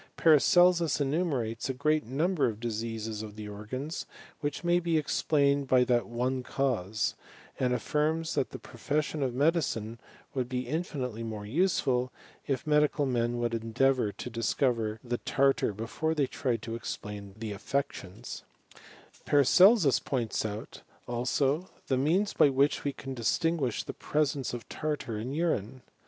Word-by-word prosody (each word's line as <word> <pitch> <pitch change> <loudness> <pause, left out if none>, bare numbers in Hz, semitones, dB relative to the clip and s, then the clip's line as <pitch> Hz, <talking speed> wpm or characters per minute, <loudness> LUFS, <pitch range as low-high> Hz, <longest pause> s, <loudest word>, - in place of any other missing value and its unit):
Paracelsus 170 +1 +5
enumerates 135 -6 -1
a 130 - -1
great 150 +3 +1
number 155 +6 +1
of 110 -2 -4
diseases 110 -1 -3
of 105 -1 -8
the 105 -1 -7
organs, 130 +10 -5 0.3
which 145 +1 -3
may 175 0 +3
be 170 -2 +1
explained 140 -2 +2
by 130 -1 +5
that 120 -1 +1
one 125 +2 -1
cause; 115 -6 -1 0.5
and 125 -1 +1
affirms, 155 +6 0
that 135 - 0
the - - -7
profession 145 +5 -2
of 130 -3 -1
medicine 130 -7 0 0.3
would 125 -2 -2
be 125 -1 -2
infinitely 130 -6 -3
more 110 -2 -5
useful, 130 - +1 0.4
if 135 +1 -1
medical 150 -1 +3
men 120 -2 0
would 120 -1 -1
endeavour 115 +1 +1
to - - -8
discover 115 -1 0
the 120 -1 -2
tartar 135 -4 +2
before 115 +10 -2
they 145 -3 +2
tried 125 -3 -2
to 115 - -5
explain 105 -3 -6
the 110 -1 -5
atFections, 105 -3 -4 0.8
Paracelsus 160 - +6
points 120 -5 -2
out, 105 0 -6 0.3
also, 135 +7 0 0.2
the 135 - +3
means 175 +10 +2
by 145 - +5
which 140 +2 +2
we 145 - 0
can 135 0 -7
distinguish 130 +2 0
the - - -6
presence 145 -3 -1
of 120 -1 -6
tartar 150 -8 -3
in 120 +5 -4
urine. 135 - -1
130 Hz, 145 wpm, -29 LUFS, 115-150 Hz, 0.8 s, Paracelsus